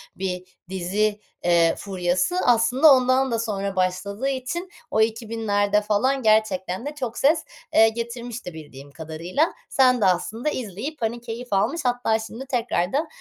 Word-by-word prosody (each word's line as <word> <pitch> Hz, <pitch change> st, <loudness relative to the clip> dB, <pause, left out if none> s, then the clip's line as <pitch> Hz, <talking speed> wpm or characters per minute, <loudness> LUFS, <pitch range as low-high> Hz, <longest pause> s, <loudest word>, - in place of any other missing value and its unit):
bir 180 Hz, -1 st, -3 dB, 0.3 s
dizi, 200 Hz, +3 st, 0 dB, 0.2 s
eee, 170 Hz, -1 st, +4 dB
furyası 185 Hz, -, -1 dB
aslında 245 Hz, +5 st, +6 dB
ondan 255 Hz, 0 st, +3 dB
da 230 Hz, -, 0 dB
sonra 200 Hz, -3 st, -2 dB
başladığı 200 Hz, +6 st, -1 dB
için 275 Hz, +8 st, -4 dB, 0.2 s
o 220 Hz, -, +2 dB
2000'lerde 220 Hz, -2 st, +1 dB
falan 250 Hz, +6 st, +1 dB
gerçekten 215 Hz, -2 st, +1 dB
de 295 Hz, +1 st, -5 dB
çok 250 Hz, -5 st, -4 dB
ses, 310 Hz, +4 st, +3 dB, 0.3 s
eee, 225 Hz, 0 st, +6 dB
getirmişti 235 Hz, -3 st, -6 dB
bildiğim 145 Hz, -3 st, -11 dB
kadarıyla. 165 Hz, -, -2 dB, 0.2 s
Sen 255 Hz, -2 st, +4 dB
de -, -, +4 dB
aslında 215 Hz, -, 0 dB
izleyip, 250 Hz, -, -5 dB
hani, 235 Hz, +1 st, -2 dB
keyif 240 Hz, +1 st, -7 dB
almış 250 Hz, +12 st, +1 dB
hatta 245 Hz, -3 st, +1 dB
şimdi 225 Hz, +4 st, -7 dB
tekrardan 250 Hz, -, 0 dB
220 Hz, 140 wpm, -23 LUFS, 190-250 Hz, 0.3 s, aslında